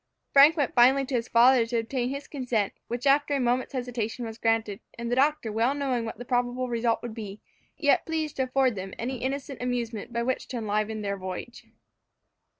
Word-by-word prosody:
Frank 290 +4 +7
went 285 -4 0
finally 265 +3 +5
to 265 - -7
his 240 -1 0
father 245 +1 +5
to 235 0 -1
obtain 240 +2 -1
his 280 +2 -5
consent, 250 -8 -1
which 240 +2 -4
after 285 +1 +3
a - - 0
moment's 250 +1 0
hesitation 245 -2 -3
was 225 0 -8
granted, 225 -3 0 0.2
the 235 +1 -2
doctor 275 -4 +2
well 230 +6 +1
knowing 260 -5 -1
what 225 - -6
the 245 - -8
probable 245 +1 0
result 230 -1 0
would 240 -2 -5
be, 210 -2 -7 0.4
yet 285 -3 +2
pleased 315 -2 -2
to 265 - +2
afford 260 -1 +2
them 190 -1 -7
any 255 +3 -3
innocent 275 +1 -4
amusement 240 -3 -3
by 235 0 -1
which 260 +1 -2
to 250 - -5
enliven 215 0 -2
their 200 0 -2
voyage. 190 +6 -7
245 Hz, 195 wpm, -27 LUFS, 225-265 Hz, 0.4 s, Frank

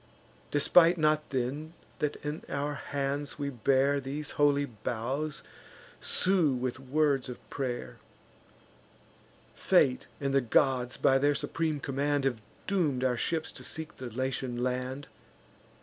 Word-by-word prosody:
Despite 165 +4 +5
not 155 -1 +2
then, 140 +5 -2 0.3
that 150 -1 0
in 150 +2 -3
our 145 +1 -1
hands 140 +1 -3
we 140 -1 -2
bear 135 +3 +2
These 140 +3 -4
holy 145 -1 +3
boughs, 130 +5 -3
and - - -20
sue 180 -7 +3
with 125 0 -3
words 135 0 +1
of 125 - -6
pray'r. 125 -3 -3 1.6
Fate 65 - +3
and 140 0 -1
the 135 - +4
gods, 125 0 +2
by 135 0 +4
their 145 +1 +3
supreme 160 -1 -1
command, 140 +1 0
Have 125 -5 0 0.2
doom'd 155 -10 +1
our 130 -1 +2
ships 160 +6 -1
to - - -10
seek 160 -1 -5
the 130 -2 -6
Latian 125 0 -2
land. 130 +2 -2
140 Hz, 135 wpm, -30 LUFS, 130-150 Hz, 1.6 s, Despite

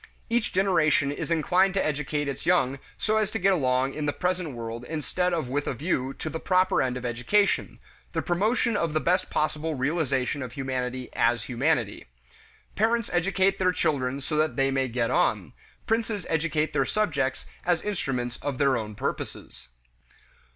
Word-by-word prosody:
Each 235 -1 +1
generation 165 -7 +3
is 145 - -4
inclined 180 +4 +3
to 195 - +2
educate 150 0 -1
its 140 - -4
young 140 -7 +3 0.2
so 215 0 +1
as 215 -2 +1
to 225 - -2
get 195 -1 +3
along 130 -4 +1
in 150 -1 -3
the - - +2
present 180 -2 -2
world 115 0 -6
instead 160 +4 -1
of 165 -6 -1
with 145 +3 -2
a - - -1
view 135 -2 -1
to - - -6
the 160 +1 -3
proper 185 +1 +3
end 125 -1 0
of 125 - -6
education: 125 - +1 0.4
the - - -1
promotion 215 +6 +1
of 165 -6 0
the 155 - +2
best 180 +4 +1
possible 155 +1 -1
realization 140 -1 0
of 125 -2 -6
humanity 130 -2 -3
as 115 -1 +2
humanity. 125 -3 0 0.7
Parents 230 +1 +1
educate 190 +2 +2
their 185 -1 +3
children 140 -5 0
so 150 +3 -3
that 155 +1 +1
they 135 -1 +2
may 135 -1 +1
get 120 -1 -1
on; - - +1 0.3
princes 220 -4 -1
educate 160 -1 0
their - - +3
subjects 140 -11 0 0.2
as 175 -1 +1
instruments 130 -12 -2
of 140 -2 -4
their 135 -2 +3
own 105 -2 -5
purposes. 65 - -5
150 Hz, 170 wpm, -26 LUFS, 130-185 Hz, 0.7 s, generation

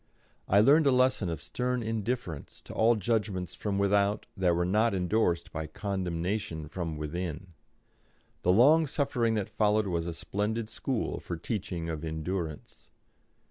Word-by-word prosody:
I 100 +2 +5
learned 145 +6 +6
a - - +6
lesson 125 -7 +3
of 80 - -4
stern 125 -1 -2
indifference 110 - -3
to - - -9
all 115 +2 +4
judgments 105 -5 -1
from 100 -2 -2
without 100 +1 +2
that 90 -4 +2
were 85 +1 +1
not 105 +3 +2
endorsed 90 -2 +1
by 80 0 -4
condemnation 90 -1 -3
from 80 -1 -4
within. 85 +3 -5 0.9
The 90 - +3
long 145 - +6
suffering 125 -6 0
that 105 -3 -1
followed 105 0 +2
was 85 -3 -1
a 85 - -4
splendid 105 +5 -2
school 130 -1 -2
for 85 - -5
the 80 - -13
teaching 90 -6 -3
of 80 -1 -4
endurance. 80 0 -5
100 Hz, 150 wpm, -29 LUFS, 85-115 Hz, 0.9 s, learned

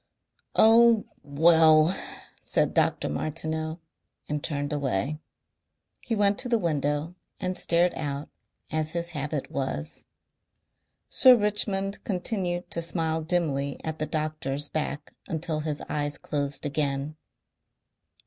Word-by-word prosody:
"Oh! 230 0 +6 0.2
WELL!" 160 +3 +5 0.4
said - - +1
Dr. - - +1
Martineau 160 - -3 0.5
and 150 -1 -3
turned 145 -2 -2
away. 140 0 -1 0.8
He 230 - -3
went 205 -1 +2
to 250 - -2
the 235 - +3
window 150 -3 -1 0.3
and 185 -1 -2
stared 175 +1 +2
out 145 -1 -4 0.4
as 155 0 -1
his 170 0 -1
habit 150 -2 -4
was. 75 - -2 1.0
Sir 255 -1 +7
Richmond 205 -2 0
continued 180 -2 -2
to 170 - 0
smile 160 -1 -1
dimly 150 -5 -1
at 160 -1 -4
the 155 - -1
doctor's 150 -2 -2
back 150 -1 -4
until 160 -1 -2
his 150 -1 -2
eyes 145 -1 -1
closed 145 0 -2
again. 145 0 -1
155 Hz, 115 wpm, -27 LUFS, 145-175 Hz, 1.0 s, Sir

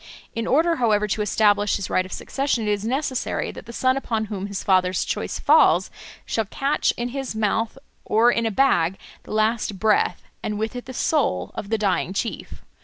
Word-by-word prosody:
In 230 -1 -3
order, 330 +5 +3
however, 210 -3 +2
to 210 - 0
establish 205 0 +2
his 195 - -3
right 185 0 0
of - - -16
succession, 265 -3 -2
it - - +2
is 205 -1 -1
necessary 260 +2 -2
that - - -11
the - - -7
son 255 +2 +1
upon 225 -5 -2
whom 195 0 -4
his 200 -1 -5
father's 185 -1 +2
choice - - -3
falls - - +4 0.3
shall 225 - -1
catch 275 +8 0
in 240 +1 -2
his 270 -2 -4
mouth 220 +3 0 0.3
or 230 +3 +4
in 230 -1 0
a - - +1
bag 195 -7 +2 0.2
the - - -12
last 215 -1 0
breath, 215 +2 +1 0.2
and 210 - -3
with 220 +3 -3
it 245 - -6
the 260 - -8
soul, 250 - 0
of 200 - -6
the 225 - +1
dying 195 -3 0
chief. 225 +3 -4
220 Hz, 195 wpm, -23 LUFS, 205-245 Hz, 0.3 s, falls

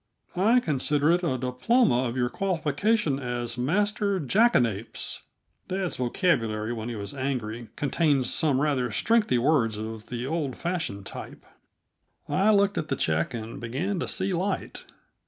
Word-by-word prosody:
I 220 +7 +4
consider 150 - +1
it 175 +1 +3
a 130 -7 0
diploma 130 - +2
of 120 +1 -3
your 120 -1 0
qualification 175 - 0
as 120 -2 -3
Master 200 - +1
Jackanapes." 130 - +1 0.5
(Dad's 185 -1 -2
vocabulary, 120 - 0
when 115 0 -5
he 120 - -4
is 100 +4 -6
angry, 120 -4 -3
contains 140 -3 +1
some 140 -2 +2
rather 135 -5 +1
strengthy 210 - +2
words 120 -5 +2
of 110 0 -6
the 120 0 -4
old 145 -3 -2
fashioned 160 - -3
type.) - - -9 0.8
I 195 +3 +2
looked 200 -1 +3
at 155 - -4
the 135 - -1
check 80 +1 0
and 115 0 -6
began 155 - -2
to - - -2
see 190 0 0
light. 190 +3 -3
140 Hz, 145 wpm, -26 LUFS, 120-185 Hz, 0.8 s, I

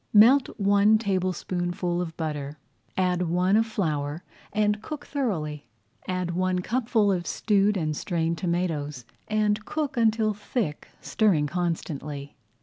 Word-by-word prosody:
Melt 245 +6 +7
one 205 +2 +5
tablespoonful 180 -3 -1
of 165 -2 -5
butter, 150 -2 -4 0.4
add 180 -2 +1
one 180 +3 +2
of 225 +1 +3
flour, 155 -6 -2 0.3
and 210 0 +1
cook 295 +4 -7
thoroughly. 155 - -2 0.4
Add 185 -1 -1
one 185 +1 0
cupful 225 -3 +2
of 175 -2 -1
stewed 205 -1 +2
and 155 -3 -1
strained 165 0 -1
tomatoes 160 -7 -2 0.2
and 215 0 +1
cook 295 -2 -3
until 220 -1 +3
thick, 205 - -3
stirring 190 -9 +2
constantly. 150 -3 -3
185 Hz, 125 wpm, -26 LUFS, 165-215 Hz, 0.4 s, Melt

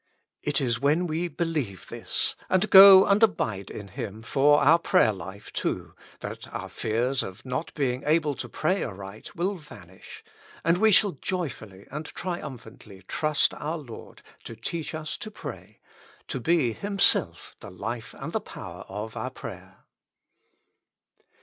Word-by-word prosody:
It 145 -1 0
is 120 -4 0
when 150 +6 +2
we 165 +1 -1
believe 155 - -3
this, - - -1
and 190 +3 +2
go 195 0 +11
and 200 +2 +3
abide 110 - +1
in 100 -2 -8
Him 105 +3 -7
forour 145 +5 +4
prayer 175 - +3
hfe, 95 +1 -9
too, - - -3 0.3
that - - -7
our - - -6
fears 120 +4 0
of 95 +7 -8
not 130 +5 -3
being 130 -3 -1
able 155 -1 +2
to - - -6
pray 185 +6 0
aright 100 0 -8
will 180 +4 0
vanish, 100 - -13 0.4
and 170 +2 +2
we 220 +1 +5
shall 200 +1 +5
joyfully 130 - -5
and 150 +2 -5
triumphantly 125 - -7
trust 155 -1 +1
our 155 +3 -4
Lord 130 -8 -11 0.2
to 115 - -8
teach 155 +8 -5
us 155 -1 -5
to 215 - -6
pray, 215 - -9 0.5
to - - -2
be 160 -9 +2
Himself 200 - +2
the - - -10
life - - -6
and - - -6
the - - 0
power - - -9
of 110 +2 -6
our - - -3
prayer. - - -11
150 Hz, 150 wpm, -26 LUFS, 110-175 Hz, 0.5 s, go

